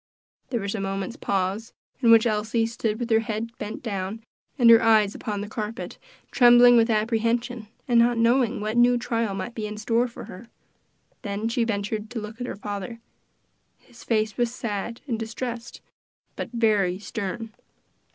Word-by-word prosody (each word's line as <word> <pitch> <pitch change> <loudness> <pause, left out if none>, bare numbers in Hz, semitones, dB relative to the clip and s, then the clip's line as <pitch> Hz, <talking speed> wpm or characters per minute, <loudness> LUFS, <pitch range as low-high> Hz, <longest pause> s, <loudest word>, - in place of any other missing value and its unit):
There 240 -3 -1
was 200 0 -3
a 220 - -3
moment's 195 +3 -3
pause, 200 -2 -2 0.3
in 240 -3 +3
which 230 0 +7
Elsie 220 +1 0
stood 225 -1 -2
with 240 -1 -3
her 220 - +5
head 225 +1 -4
bent 210 +2 -6
down 200 0 -4 0.3
and 245 -4 +4
her 230 - +8
eyes 215 -2 +4
upon 205 -2 -4
the 205 - -5
carpet, 220 +2 -6 0.3
trembling 245 0 +7
with 230 0 +4
apprehension, 230 +1 0 0.2
and 240 -2 +4
not 235 0 +3
knowing 235 +1 +2
what 215 +2 -2
new 245 0 +5
trial 230 -3 -2
might 215 +5 -5
be 215 -2 -4
in 210 0 -7
store 230 +3 +1
for 235 - -10
her. 200 +6 -11 0.7
Then 205 +2 -3
she 235 0 0
ventured 210 0 -3
to 245 - -4
look 215 +3 -8
at 245 - -3
her - - -5
father. 205 +2 -6 0.8
His 235 - -17
face 215 -2 0
was 240 -2 +1
sad 230 -1 -4
and 235 -6 -3
distressed, 235 +1 -6 0.5
but - - -5
very 210 -6 +2
stern. 220 +1 -5
225 Hz, 170 wpm, -25 LUFS, 210-235 Hz, 0.8 s, her